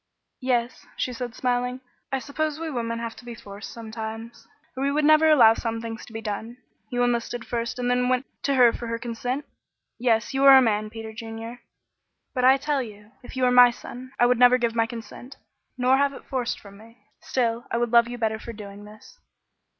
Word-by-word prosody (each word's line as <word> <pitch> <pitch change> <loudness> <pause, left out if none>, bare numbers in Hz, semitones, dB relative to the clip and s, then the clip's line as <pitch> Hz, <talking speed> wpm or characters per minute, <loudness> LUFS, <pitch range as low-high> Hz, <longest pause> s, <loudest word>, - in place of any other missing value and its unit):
"Yes," 250 -1 -1
she 250 - -2
said, 245 -1 -6
smiling, 250 0 -1 0.3
"I 270 - +1
suppose 300 +3 -3
we 325 -1 -4
women 230 -3 -2
have 230 -1 -5
to - - -12
be 240 -1 -8
forced 200 -1 -10
sometimes, 225 +1 -8 0.3
or 275 +2 0
we 300 +2 +1
never 310 +1 +6
would 310 - +7
allow 230 -6 +7
some 230 0 -3
things 230 0 -7
to - - -13
be 225 - -5
done. 220 +3 -5 0.3
You 245 0 0
enlisted 240 0 -1
first 235 +1 -3
and 245 0 -2
then 250 0 +2
went 255 +1 +1 0.2
to 280 - +2
her 245 -3 +6
for 235 - -6
her 230 0 -2
consent? 245 +4 -4 0.5
Yes, 235 0 +1
you 270 +1 +1
are 270 -1 +10
a - - +9
man, 215 -4 +1
Peter 220 0 -8
Junior. 225 +1 -7 0.7
But 250 -2 +1
I 265 +1 +7
tell 285 0 -1
you, 210 -2 -10
if 245 - -11
you 260 - 0
were 250 - +4
my 250 0 +8
son, 250 +1 -9
I 240 - +6
would 245 -1 +3
never 250 0 +7
give 235 -2 0
my 230 -1 +1
consent 235 +2 -10 0.4
nor 255 +1 +3
have 280 0 +2
it - - -12
forced 255 -3 -2
from 200 -1 -14
me 230 +2 -17 0.2
still 235 -2 -1
I 230 - -1
would 240 -1 0
love 235 -1 +6
you 245 0 -6
better 220 -2 -1
for 235 - -8
doing 205 -1 -10
this." 215 - -15
240 Hz, 215 wpm, -25 LUFS, 225-255 Hz, 0.7 s, are